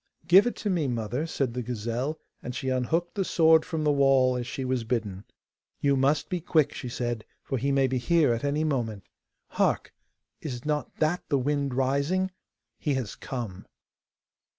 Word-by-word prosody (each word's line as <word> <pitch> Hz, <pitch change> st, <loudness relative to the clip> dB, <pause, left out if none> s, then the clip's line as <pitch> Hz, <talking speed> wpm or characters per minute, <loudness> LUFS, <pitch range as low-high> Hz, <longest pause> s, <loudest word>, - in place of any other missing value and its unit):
'Give 185 Hz, +7 st, +7 dB
it 245 Hz, -, -2 dB
to 210 Hz, -, -3 dB
me, 165 Hz, -6 st, +1 dB
mother!' 120 Hz, +5 st, -2 dB
said 135 Hz, -6 st, -1 dB
the 125 Hz, -, -2 dB
gazelle, 120 Hz, +5 st, -3 dB, 0.2 s
and 125 Hz, -, -6 dB
she 130 Hz, +1 st, -2 dB
unhooked 145 Hz, +7 st, 0 dB
the 200 Hz, -, 0 dB
sword 160 Hz, -3 st, +5 dB
from 160 Hz, -3 st, -3 dB
the 150 Hz, -, +3 dB
wall, 135 Hz, -2 st, +4 dB
as 120 Hz, -1 st, -3 dB
she 130 Hz, -, -4 dB
was 130 Hz, -2 st, 0 dB
bidden. 110 Hz, -5 st, -3 dB, 0.5 s
'You 140 Hz, -1 st, +3 dB
must 140 Hz, +3 st, +2 dB
be 180 Hz, -2 st, -2 dB
quick,' 155 Hz, -3 st, +2 dB
she 125 Hz, -, -6 dB
said, 120 Hz, -2 st, -3 dB, 0.2 s
'for 135 Hz, -, -2 dB
he 140 Hz, +4 st, 0 dB
may 135 Hz, -1 st, +3 dB
be 130 Hz, -1 st, 0 dB
here 155 Hz, -1 st, +3 dB
at 115 Hz, -, -3 dB
any 145 Hz, +2 st, +1 dB
moment. 120 Hz, -9 st, -1 dB, 0.5 s
Hark! -, -, 0 dB, 0.5 s
is 125 Hz, -4 st, -5 dB
not 150 Hz, -1 st, -2 dB
that 160 Hz, +3 st, 0 dB
the 140 Hz, -, +3 dB
wind 140 Hz, 0 st, 0 dB
rising? 140 Hz, +9 st, +1 dB, 0.5 s
He 145 Hz, -4 st, 0 dB
has 125 Hz, -6 st, -3 dB
come! 110 Hz, -8 st, -6 dB
135 Hz, 180 wpm, -27 LUFS, 125-155 Hz, 0.5 s, Give